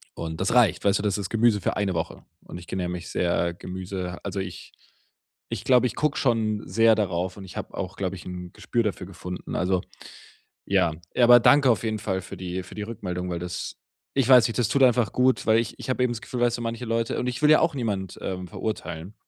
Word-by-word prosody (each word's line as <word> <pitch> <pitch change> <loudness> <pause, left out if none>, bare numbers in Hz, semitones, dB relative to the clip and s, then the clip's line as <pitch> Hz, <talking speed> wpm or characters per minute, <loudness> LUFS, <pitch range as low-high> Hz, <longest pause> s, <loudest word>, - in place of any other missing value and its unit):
und 80 0 -5
das 95 - +1
reicht, 120 -6 +4
weißt 100 0 +3
du? - - -4
Das 105 -2 +1
ist 100 -3 -4
Gemüse 115 -2 +3
für - - -1
eine 100 -2 0
Woche 80 - -4 0.2
und - - -9
ich 85 - -13
ernähre 90 -2 -2
mich 90 -1 -5
sehr 85 -1 0
Gemüse 90 0 -6
also 100 - -3
ich 95 -2 -7 0.8
ich - - -4
glaube, 125 -1 +5
ich - - -7
gucke 150 -1 0
schon 110 -4 +1
sehr 115 +4 +5
darauf 90 -2 -1
und 95 - -9
ich 90 - -10
habe - - -6
auch, 95 0 -4
glaube 95 -1 -2
ich, 90 - -11
'n 90 -1 -7
Gespür 120 -1 -1
dafür 100 -3 -3
gefunden. 90 -1 -7
Also, 90 0 +1 0.9
ja, 85 - +3 0.2
ja, 125 - +4
aber 120 0 +9
danke 135 +2 +6
auf 115 - +1
jeden 110 -1 -1
Fall 95 -2 -1
für - - -9
die 90 0 -4
für 90 - -12
die 105 - -4
Rückmeldung, 90 -5 -4
weil 85 - -2
das 90 0 -5 0.4
ich 135 -3 +2
weiß 125 -2 +7
nicht, 115 - -4
das 120 - +2
tut 140 - +2
einfach 125 -3 +4
gut, 130 0 +2
weil 110 0 +5
ich 115 - -5
ich - - -6
habe 130 - 0
eben 120 - +1
das 115 - -6
Gefühl, 125 -2 -5
weißt 120 -1 +2
du, - - -5
manche 115 +1 -4
Leute 115 0 -1
und - - -2
ich 125 +3 -4
will 150 - +6
ja 155 - +7
auch 165 -2 +2
niemand, 100 -7 -3
ähm, 90 -1 -4
verurteilen. 90 -2 -5
105 Hz, 240 wpm, -25 LUFS, 90-120 Hz, 0.9 s, aber